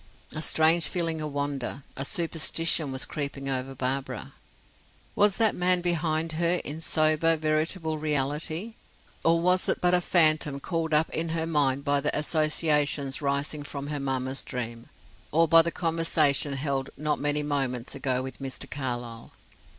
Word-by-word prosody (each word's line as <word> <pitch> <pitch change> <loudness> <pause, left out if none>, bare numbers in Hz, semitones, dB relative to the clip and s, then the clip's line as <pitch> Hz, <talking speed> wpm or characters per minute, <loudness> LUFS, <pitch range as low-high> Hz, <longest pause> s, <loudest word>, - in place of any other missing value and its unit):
A 155 - -5
strange 160 +1 +4
feeling 165 -2 -1
of 150 -1 -4
wonder, 140 -1 -3
of 135 +1 -3
superstition 165 -2 +1
was 130 -1 +1
creeping 140 -2 -5
over 135 0 -3
Barbara. 130 -1 -4 0.8
Was 205 -1 +3
that 225 -2 +3
man 180 0 +2
behind 165 -2 0
her 170 +2 +1
in 155 +3 -5
sober, 155 +1 +2
veritable 155 +1 -1
reality 155 +7 -1 0.5
or 165 0 +3
was 180 +2 +2
it - - +1
but 180 0 +2
a 180 - +4
phantom 155 -5 +3
called 165 +1 -3
up 155 +2 +2
in 165 +1 -2
her 160 0 -1
mind 140 -4 +1
by 145 0 +1
the 150 - 0
associations 150 -2 +1
rising 140 +1 -2
from 140 -1 -6
her 150 -1 -3
mamma's 135 -1 -2
dream; 115 -2 -6 0.4
or 165 +2 +3
by 165 +1 +8
the 170 - -1
conversation 160 -4 +2
held 135 -1 -2
not 150 +1 -1
many 145 0 0
moments 135 -4 -2
ago 130 -2 -1
with 130 -1 -8
Mr. 135 -1 -4
Carlyle. 120 -4 -6
150 Hz, 155 wpm, -27 LUFS, 135-165 Hz, 0.8 s, by